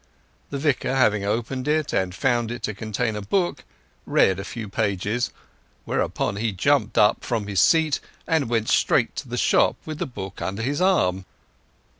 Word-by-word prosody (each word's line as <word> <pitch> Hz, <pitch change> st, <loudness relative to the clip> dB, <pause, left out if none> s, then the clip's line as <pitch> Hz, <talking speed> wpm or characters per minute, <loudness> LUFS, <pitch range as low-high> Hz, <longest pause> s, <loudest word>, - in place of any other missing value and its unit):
The 140 Hz, -, -3 dB
Vicar 135 Hz, -2 st, 0 dB
having 105 Hz, -6 st, +3 dB
opened 120 Hz, +5 st, -2 dB
it 150 Hz, 0 st, +1 dB
and 95 Hz, -1 st, 0 dB
found 120 Hz, -3 st, +1 dB
it 120 Hz, -, -6 dB
to 110 Hz, -, -2 dB
contain 110 Hz, +2 st, -2 dB
a 105 Hz, -, -4 dB
book, 175 Hz, -, -1 dB, 0.4 s
read 95 Hz, 0 st, +3 dB
a -, -, -4 dB
few 110 Hz, +1 st, -6 dB
pages; 105 Hz, +3 st, -1 dB, 0.6 s
whereupon 100 Hz, -, -1 dB
he 110 Hz, +1 st, 0 dB
jumped 110 Hz, +3 st, +1 dB
up 105 Hz, 0 st, +4 dB
from 115 Hz, -4 st, -2 dB
his 100 Hz, -2 st, -1 dB
seat 160 Hz, -3 st, +4 dB, 0.3 s
and 160 Hz, -7 st, +1 dB
went 115 Hz, -2 st, 0 dB
straight -, -, +2 dB
to -, -, -5 dB
the -, -, -3 dB
shop -, -, +3 dB
with 155 Hz, -1 st, -6 dB
the -, -, -2 dB
book 100 Hz, -6 st, -8 dB
under 100 Hz, +4 st, -3 dB
his 145 Hz, +6 st, -1 dB
arm. 95 Hz, -, +2 dB
115 Hz, 175 wpm, -24 LUFS, 100-140 Hz, 0.6 s, up